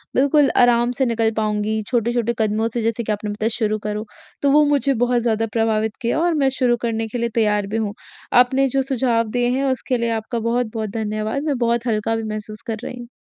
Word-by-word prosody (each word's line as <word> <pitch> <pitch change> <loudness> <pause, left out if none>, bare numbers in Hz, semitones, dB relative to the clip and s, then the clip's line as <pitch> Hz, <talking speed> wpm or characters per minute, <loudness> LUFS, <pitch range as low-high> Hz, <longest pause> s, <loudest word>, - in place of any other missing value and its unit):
बिल्कुल 280 +1 +4
आराम 240 0 +4
से 265 - +2
निकल 225 -2 +1
पाऊँगी 215 0 0
छोटे-छोटे 235 -1 0
कदमों 220 +1 +1
से 240 - -1
जैसे 230 +1 -1
कि 220 - -2
आपने 210 0 -3
बताया 215 +2 -1
कि - - -3
शुरू 215 -2 0
करो, 210 +1 -4 0.4
तो 280 - +3
वो 300 +2 +6
मुझे 285 -1 +2
बहुत 245 0 +1
ज़्यादा 225 -1 +1
प्रभावित 220 -1 0
किया 235 +5 0
और 345 +1 +2
मैं 275 -4 +2
शुरू 245 -2 +3
करने 225 -1 -1
के 220 - -5
लिए 235 0 -1
तैयार 210 -3 +2
भी 215 +3 -2
हूँ। 215 -2 -2 0.5
आपने 265 +2 +2
जो 270 +2 +1
सुझाव 250 -4 0
दिए 245 0 +1
हैं 275 - 0
उसके 260 0 -1
लिए 235 0 -1
आपका 230 +2 -4
बहुत-बहुत 230 -1 -1
धन्यवाद 215 +4 -3
मैं 295 -4 0
बहुत 235 0 0
हल्का 220 0 0
भी 225 - -3
महसूस 215 0 -6
कर 225 -1 -2
रही। 245 -1 -7
230 Hz, 220 wpm, -21 LUFS, 220-245 Hz, 0.5 s, वो